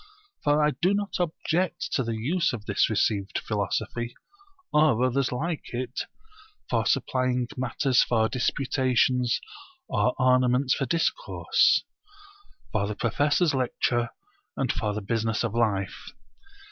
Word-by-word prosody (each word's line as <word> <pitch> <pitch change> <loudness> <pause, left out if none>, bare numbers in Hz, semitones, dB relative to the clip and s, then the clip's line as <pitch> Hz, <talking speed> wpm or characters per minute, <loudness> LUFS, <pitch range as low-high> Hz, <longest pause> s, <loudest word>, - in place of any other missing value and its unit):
For 150 +1 +3
I 150 - +3
do 185 +3 +3
not 205 -1 -3
object 175 +1 -1
to - - +1
the 115 -1 -3
use 165 +10 0
of 110 -3 -6
this 105 -2 +2
received 100 -2 0
philosophy, 110 +3 -2 0.6
or 150 -6 +4
others 130 +1 +1
like 150 +6 -3
it, 125 +1 -3 0.6
for - - 0
supplying 130 -1 +1
matter 130 +2 -1
for 115 -2 +4
disputations 125 -1 +1 0.5
or 125 - +1
ornaments 130 +1 +3
for 135 - -1
discourse, 170 - +2 0.9
for 100 -2 0
the 105 - -4
professor's 145 - +1
lecture 120 -2 0 0.5
and - - +1
for 105 - -1
the 105 - -3
business 115 +2 -1
of 115 -3 -2
life. 105 -5 -1
125 Hz, 125 wpm, -26 LUFS, 115-145 Hz, 0.9 s, or